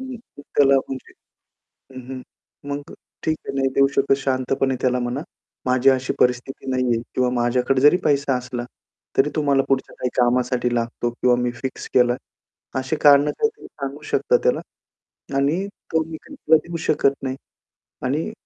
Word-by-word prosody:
हं, 260 Hz, -, -6 dB
हं, 230 Hz, -11 st, -14 dB
त्याला 140 Hz, -1 st, +6 dB
म्हणजे 130 Hz, -1 st, -7 dB, 0.8 s
हं, 130 Hz, -, -6 dB
हं, 130 Hz, -1 st, -6 dB, 0.5 s
मग 145 Hz, 0 st, -5 dB, 0.3 s
ठीक 155 Hz, 0 st, 0 dB
आहे, -, -, -3 dB
नाही 135 Hz, -1 st, +2 dB
देऊ 135 Hz, 0 st, +5 dB
शकत. 135 Hz, 0 st, +3 dB
शांतपणे 135 Hz, 0 st, 0 dB
त्याला 125 Hz, -1 st, +2 dB
म्हणा, 120 Hz, +3 st, -2 dB, 0.4 s
माझी 130 Hz, +1 st, +4 dB
अशी 130 Hz, 0 st, +1 dB
परिस्थिती 125 Hz, +2 st, 0 dB
नाहीये 125 Hz, -3 st, +1 dB
किंवा 125 Hz, -1 st, +2 dB
माझ्याकडे 125 Hz, +2 st, +1 dB
जरी 145 Hz, +5 st, +6 dB
पैसा 140 Hz, -2 st, +2 dB
असला, 125 Hz, -1 st, -5 dB, 0.5 s
तरी 140 Hz, +2 st, +4 dB
तो 155 Hz, -, +1 dB
मला 140 Hz, -1 st, +3 dB
पुढच्या 135 Hz, -1 st, 0 dB
काही 125 Hz, -, -1 dB
कामासाठी 125 Hz, 0 st, +2 dB
लागतो, 120 Hz, 0 st, -1 dB
किंवा 125 Hz, +1 st, +2 dB
मी 125 Hz, 0 st, 0 dB
फिक्स 130 Hz, -1 st, -5 dB
केला 125 Hz, -1 st, +5 dB
आहे. 130 Hz, -, -10 dB
अशी 130 Hz, +4 st, -2 dB
कारणं 145 Hz, 0 st, +6 dB
काहीतरी 440 Hz, 0 st, -1 dB
सांगू 140 Hz, 0 st, -7 dB
शकता 485 Hz, -, +3 dB
त्याला. -, -, +2 dB, 0.8 s
आणि 155 Hz, +8 st, +1 dB, 0.3 s
तो 160 Hz, 0 st, +2 dB
मी 160 Hz, 0 st, -8 dB
काही, 295 Hz, -, -12 dB
तूला 160 Hz, -, +4 dB
देऊ 170 Hz, 0 st, -4 dB
शकत 140 Hz, -2 st, +3 dB
नाही, 130 Hz, -1 st, -2 dB, 0.7 s
आणि 150 Hz, -, -1 dB
135 Hz, 165 wpm, -22 LUFS, 125-145 Hz, 0.8 s, त्याला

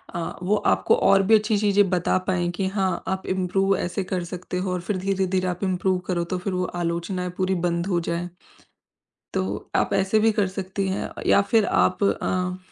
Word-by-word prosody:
अ, 170 Hz, -1 st, -3 dB
वो 200 Hz, +4 st, +2 dB
आपको 95 Hz, -, +2 dB
और 195 Hz, 0 st, +4 dB
भी 220 Hz, +3 st, +5 dB
अच्छी 215 Hz, 0 st, +2 dB
चीज़ें 205 Hz, -1 st, +3 dB
बता 180 Hz, 0 st, +1 dB
पाएँ 175 Hz, -2 st, 0 dB
कि 190 Hz, +1 st, -1 dB
हाँ, 190 Hz, -1 st, -1 dB
आप 190 Hz, 0 st, -2 dB
इम्प्रूव 190 Hz, +1 st, +1 dB
ऐसे 180 Hz, +2 st, -2 dB
कर 185 Hz, -1 st, -3 dB
सकते 180 Hz, +1 st, -6 dB
हो। 185 Hz, 0 st, -2 dB
और 180 Hz, -, -2 dB
फ़िर 190 Hz, +3 st, -2 dB
धीरे-धीरे 190 Hz, -1 st, 0 dB
आप 180 Hz, +1 st, -3 dB
इम्प्रूव 185 Hz, 0 st, +1 dB
करो 175 Hz, -2 st, 0 dB
तो -, -, 0 dB
फ़िर 185 Hz, +2 st, -3 dB
वो 180 Hz, 0 st, 0 dB, 0.2 s
आलोचनाएँ 170 Hz, +2 st, -2 dB
पूरी 185 Hz, 0 st, +1 dB
बंद 170 Hz, +1 st, 0 dB
हो 180 Hz, -3 st, +1 dB
जाएँ। 170 Hz, +1 st, -2 dB, 1.1 s
तो 95 Hz, +2 st, -3 dB
आप -, -, +1 dB
ऐसे 195 Hz, +2 st, +2 dB
भी 220 Hz, +1 st, +4 dB
कर 200 Hz, -, +3 dB
सकती 190 Hz, +1 st, -2 dB
हैं 190 Hz, -, -3 dB, 0.2 s
या -, -, +5 dB
फ़िर 220 Hz, -3 st, +5 dB
आप 185 Hz, +2 st, +2 dB
अ, 185 Hz, -2 st, 0 dB
185 Hz, 200 wpm, -24 LUFS, 180-195 Hz, 1.1 s, भी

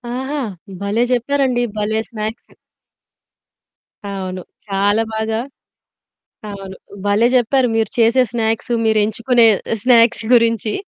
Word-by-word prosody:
ఆహా! 270 Hz, +3 st, -3 dB, 0.4 s
భలే! 205 Hz, +4 st, 0 dB
జెప్పారండి. 250 Hz, 0 st, +1 dB
భలే 215 Hz, +1 st, 0 dB
స్నాక్స్. 220 Hz, 0 st, -6 dB, 1.6 s
అవును. 185 Hz, -2 st, -5 dB, 0.3 s
చాలా 205 Hz, +3 st, +1 dB
బాగా 220 Hz, 0 st, -2 dB, 1.1 s
అవును. 195 Hz, -1 st, -8 dB, 0.3 s
భలే! 205 Hz, +4 st, +3 dB
జెప్పారు 250 Hz, +1 st, +2 dB
మీరు 220 Hz, -2 st, +1 dB
చేసే 235 Hz, +3 st, +4 dB
స్నాక్స్, 225 Hz, 0 st, -2 dB
మీరెంచుకునే 220 Hz, +2 st, +3 dB, 0.4 s
స్నాక్స్ 235 Hz, -2 st, +4 dB
గురించి. 230 Hz, -2 st, +2 dB
225 Hz, 95 wpm, -18 LUFS, 210-240 Hz, 1.6 s, చేసే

